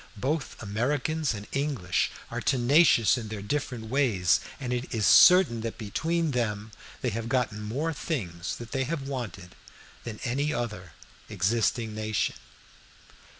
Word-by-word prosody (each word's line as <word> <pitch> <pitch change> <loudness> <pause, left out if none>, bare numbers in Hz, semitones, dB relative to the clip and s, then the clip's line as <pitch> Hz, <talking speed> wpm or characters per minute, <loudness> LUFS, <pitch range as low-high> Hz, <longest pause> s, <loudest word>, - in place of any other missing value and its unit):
Both 140 +7 -2
Americans 135 +6 -1
and 100 0 -7
English 135 - 0 0.2
are - - -3
tenacious 130 -2 +4
in 110 - -6
their 105 -2 -6
different 125 -1 -3
ways, 115 -11 +3 0.2
and 125 -3 -3
it 125 +1 -3
is 110 -4 0
certain 180 -11 +7
that 115 0 -4
between 160 +9 -1
them 110 -4 -2 0.3
they 125 - 0
have 115 +2 -4
gotten 120 -4 0
more 140 +10 -2
things 90 - -4
that 120 -2 -9
they 135 -1 0
have 140 -1 -3
wanted 115 -9 -6 0.5
than 110 -2 -7
any 140 +4 0
other 105 - -4 0.4
existing 110 +3 0
nation. 110 0 -1
120 Hz, 140 wpm, -27 LUFS, 105-140 Hz, 0.5 s, certain